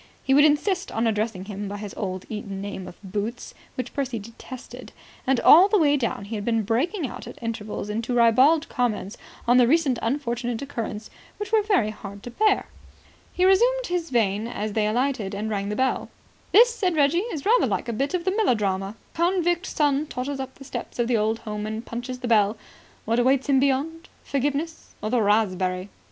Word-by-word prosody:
He 270 - +2
would 290 +2 +7
insist 360 +6 +1
on 225 +1 0
addressing 215 -3 -1
him 205 0 -5
by 205 +1 -5
his 205 -1 -7
old 185 -2 -4
Eton 205 -3 -6
nickname 195 -2 -6
of 180 - -11
Boots 210 +5 -4 0.2
which 255 - -5
Percy 265 -4 -2
detested. 230 +4 -10 0.3
And 265 -2 +3
all 360 +5 +8
the 420 - +3
way 295 -5 +4
down 235 -7 -2
he 210 - -7
had 210 -2 -3
been 225 0 +1
breaking 290 - 0
out 250 - -7
at - - -10
intervals 220 -3 -4
into 230 +4 -2
ribald 260 +8 +5
comments 230 - -2 0.3
on 245 +1 +5
the 245 -2 +6
recent 280 -3 +2
unfortunate 240 -2 -2
occurrence 225 -6 -5 0.3
which 415 -1 -5
were 440 -1 +4
very 395 - +1
hard 200 -1 -10
to 245 - -7
bear. 425 - +2 0.7
He 365 - +1
resumed - - +4
this 350 -2 -1
vein 220 -3 +1
as 215 -3 -4
they 210 -1 +1
alighted 225 -3 -1
and 215 +2 -3
rang 200 -1 -2
the 210 - -2
bell. 260 +2 0 0.4
"This," 475 +3 +7
said 370 -7 0
Reggie, 295 +3 +3
"is 300 -6 -5
rather 475 +4 +4
like - - -2
a 235 - -2
bit 275 +9 -1
out 360 - -1
of 345 - -15
a 375 - +2
melodrama. 205 - 0 0.2
Convict 350 +1 +1
son 290 0 +1
totters 270 +1 -4
up 265 0 -6
the 275 - -12
steps - - -6
of 240 -1 +1
the 240 -2 +2
old 220 +1 +1
home 210 -1 -4
and 220 +2 -5
punches 245 +2 -6
the 250 - -3
bell. 215 -2 +3 0.5
What 230 +2 +1
awaits 260 +2 +2
him 270 -1 +5
beyond? 285 +5 0
Forgiveness? 290 +4 -3
Or 215 - -3
the 245 -2 +3
raspberry? 190 -3 +1
245 Hz, 200 wpm, -24 LUFS, 215-295 Hz, 0.7 s, all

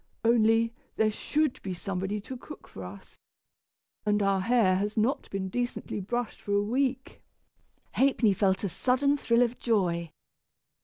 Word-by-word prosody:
Only, 230 0 +4 0.2
there 220 -1 +2
should 300 +5 -1
be 190 -2 -4
somebody 190 +3 -3
to 260 - -7
cook 300 +5 -11
for 95 - -9
us, 95 +2 -11 0.8
and 210 -1 +1
our 195 -1 +2
hair 200 -3 +3
has 205 +3 -2
not 230 +6 0
been 195 -1 -3
decently 245 +1 -3
brushed 240 +4 -3
for 205 - -3
a 205 - +3
week." 260 +4 -1 0.7
Ha'penny 255 -6 +3
felt 190 0 +1
a 200 - 0
sudden 265 - +2
thrill 240 -3 +3
of 245 0 -2
joy. 175 -7 0
215 Hz, 150 wpm, -28 LUFS, 195-245 Hz, 0.8 s, Only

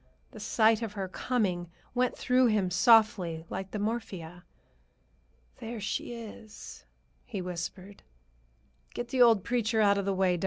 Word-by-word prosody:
The - - -11
sight 220 0 +3
of 225 -3 -4
her, 195 -2 -4
coming, 185 -5 -1 0.2
went 250 0 0
through 255 0 +3
him 205 -5 +1
softly, 190 -4 +4
like 190 0 -4
the 210 - -5
morphia. 195 -6 -4 1.1
"There 235 -1 -6
she 215 +3 -3
is," 220 -2 -10 0.4
he 210 -5 -6
whispered. 180 +2 -6 0.9
"Get 240 0 -4
the 260 -2 +1
old 225 -5 +6
preacher 230 -2 0
out 200 -1 +4
of 200 - -3
the 195 -1 0
way, 185 -1 +2
doc. - - -7
210 Hz, 150 wpm, -29 LUFS, 185-230 Hz, 1.1 s, old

